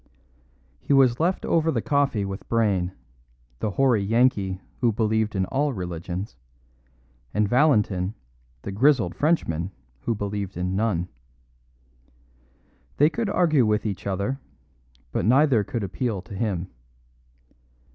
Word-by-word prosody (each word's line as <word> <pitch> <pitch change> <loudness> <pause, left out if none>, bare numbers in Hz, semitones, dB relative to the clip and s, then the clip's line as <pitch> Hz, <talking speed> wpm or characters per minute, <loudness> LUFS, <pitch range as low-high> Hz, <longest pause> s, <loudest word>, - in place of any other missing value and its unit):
He - - 0
was 130 -3 +4
left 175 +4 0
over 165 -1 +2
the - - 0
coffee 140 -8 +1
with 95 0 -7
Brayne, 100 -6 +1 0.7
the - - -1
hoary 120 0 +2
Yankee 105 -4 +2 0.2
who 120 -2 +3
believed 110 0 0
in 95 -1 +1
all 140 +6 0
religions, 90 0 -5 1.0
and 105 0 +2
Valentin, 105 -7 +2 0.5
the 100 - -5
grizzled 115 -3 +3
Frenchman 95 - 0 0.3
who 115 - -1
believed 100 -2 -4
in 90 +1 -2
none. 100 -5 0 1.9
They 150 +3 +5
could 225 +1 -2
argue 160 - +3
with 105 +1 +1
each 100 -2 -3
other, 100 +8 -2 0.7
but - - -1
neither 130 -1 +4
could 120 -2 -4
appeal 100 0 -2
to 100 - -11
him. 95 -3 -2
110 Hz, 125 wpm, -25 LUFS, 95-135 Hz, 1.9 s, They